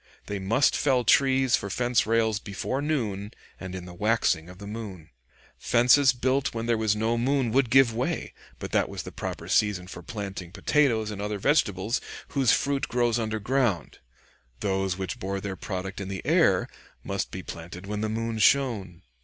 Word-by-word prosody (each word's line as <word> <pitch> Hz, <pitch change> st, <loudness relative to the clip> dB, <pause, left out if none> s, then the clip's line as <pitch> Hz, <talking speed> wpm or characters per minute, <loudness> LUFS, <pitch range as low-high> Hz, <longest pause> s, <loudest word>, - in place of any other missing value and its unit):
They 100 Hz, -1 st, -4 dB
must 110 Hz, +8 st, +2 dB
fell 130 Hz, -4 st, +2 dB
trees 130 Hz, +2 st, +4 dB
for 100 Hz, -, -4 dB
fence 120 Hz, +3 st, +1 dB
rails 110 Hz, -2 st, +2 dB
before 105 Hz, +7 st, -3 dB
noon, 110 Hz, -9 st, -2 dB, 0.3 s
and 95 Hz, -1 st, -6 dB
in 90 Hz, -1 st, -6 dB
the 90 Hz, -, -10 dB
waxing 105 Hz, -4 st, +1 dB
of 90 Hz, -, -12 dB
the 100 Hz, -, -10 dB
moon. 100 Hz, -6 st, -7 dB, 0.5 s
Fences 125 Hz, +4 st, +5 dB
built 130 Hz, +1 st, 0 dB
when 115 Hz, 0 st, -2 dB
there 120 Hz, 0 st, +2 dB
was 110 Hz, -1 st, +1 dB
no 115 Hz, +2 st, 0 dB
moon 130 Hz, -1 st, +1 dB
would 130 Hz, 0 st, +2 dB
give 130 Hz, -2 st, +5 dB
way; 120 Hz, +3 st, -2 dB, 0.2 s
but -, -, -7 dB
that -, -, +2 dB
was -, -, -5 dB
the -, -, -8 dB
proper -, -, -6 dB
season 105 Hz, -4 st, +2 dB
for 90 Hz, -, -9 dB
planting 100 Hz, -5 st, -6 dB
potatoes 115 Hz, -4 st, +1 dB
and 100 Hz, -1 st, -6 dB
other 105 Hz, 0 st, -2 dB
vegetables 105 Hz, -3 st, +1 dB, 0.3 s
whose 135 Hz, -4 st, +3 dB
fruit 140 Hz, +2 st, +1 dB
grows 120 Hz, -1 st, +1 dB
underground; 110 Hz, -1 st, -1 dB, 0.6 s
those 95 Hz, -2 st, 0 dB
which 95 Hz, -2 st, -4 dB
bore 95 Hz, +1 st, -3 dB
their 95 Hz, -1 st, -5 dB
product 95 Hz, 0 st, -5 dB
in 95 Hz, -, -5 dB
the 95 Hz, -1 st, -6 dB
air -, -, +3 dB, 0.4 s
must -, -, -3 dB
be -, -, -7 dB
planted 90 Hz, +3 st, -8 dB
when 105 Hz, +1 st, -3 dB
the 110 Hz, -, -1 dB
moon 115 Hz, 0 st, -2 dB
shone. 105 Hz, -8 st, +2 dB
110 Hz, 180 wpm, -26 LUFS, 95-125 Hz, 0.6 s, Fences